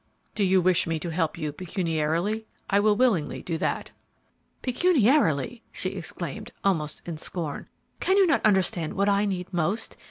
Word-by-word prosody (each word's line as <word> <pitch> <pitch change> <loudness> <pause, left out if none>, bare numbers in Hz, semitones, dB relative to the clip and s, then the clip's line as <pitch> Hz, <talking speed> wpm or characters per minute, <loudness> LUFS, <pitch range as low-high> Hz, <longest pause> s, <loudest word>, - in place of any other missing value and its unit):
"Do 210 - 0
you 190 -1 +4
wish 180 -1 +3
me 165 0 0
to 170 +2 -4
help 160 -1 -1
you 150 -1 -3
pecuniarily? 170 +4 -1 0.2
I 200 - +5
will 210 0 +4
willingly 205 - +1
do 165 -2 -3
that." - - -2 0.7
"Pecuniarily!" 245 - +2
she - - -2
exclaimed, - - -6
almost 155 -6 0
in 170 -2 -5
scorn. 155 -2 -5 0.3
"Cannot 385 0 +4
you 325 - +3
understand 185 -6 +2
what 200 +1 +2
I 200 +1 +3
need 185 -2 -3
most? 180 +6 -1
185 Hz, 155 wpm, -26 LUFS, 165-215 Hz, 0.7 s, I